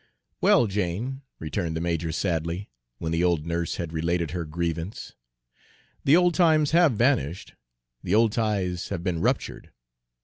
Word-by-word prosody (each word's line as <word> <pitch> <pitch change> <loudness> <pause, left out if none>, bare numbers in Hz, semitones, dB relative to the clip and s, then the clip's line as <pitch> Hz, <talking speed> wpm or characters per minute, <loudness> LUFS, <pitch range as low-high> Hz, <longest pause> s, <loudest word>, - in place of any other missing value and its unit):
"Well, 120 - +5
Jane," 105 +7 -2 0.2
returned 80 +1 -3
the - - -2
major 85 -1 -1
sadly, 85 +2 -2 0.3
when 80 +4 -4
the 85 +1 +1
old 85 -4 +1
nurse 85 0 -2
had 85 -2 -5
related 85 0 -1
her 85 -1 -3
grievance, 85 +3 -4 0.9
"the 140 - +6
old 175 -1 +3
times 155 -4 +3
have 170 -4 +5
vanished, 105 - 0 0.5
the 95 - 0
old 115 0 +4
ties 100 -6 -1
have 85 - -4
been 85 -3 -1
ruptured. - - -1
85 Hz, 145 wpm, -26 LUFS, 85-110 Hz, 0.9 s, the